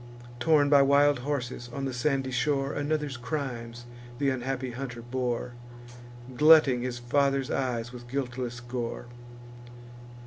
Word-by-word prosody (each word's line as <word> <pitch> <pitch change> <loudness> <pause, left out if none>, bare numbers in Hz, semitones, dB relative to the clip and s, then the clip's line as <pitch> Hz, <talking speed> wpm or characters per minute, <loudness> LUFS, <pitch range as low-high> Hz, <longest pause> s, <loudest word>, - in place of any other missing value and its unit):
Torn 150 +1 +4
by 140 -1 +6
wild 140 0 +4
horses 125 -3 -4
on 135 +2 -4
the 135 - -3
sandy 135 +1 0
shore, 135 +2 0
Another's 145 -2 -2
crimes 120 -3 -5 0.3
th' 145 - -5
unhappy 130 -1 -1
hunter 120 -1 -6
bore, 120 0 -3 0.8
Glutting 150 -3 +6
his 125 -1 -3
father's 135 +2 +1
eyes 120 -2 -2
with 120 -1 -10
guiltless 125 -2 -4
gore. 120 -1 -5
130 Hz, 125 wpm, -28 LUFS, 120-140 Hz, 0.8 s, by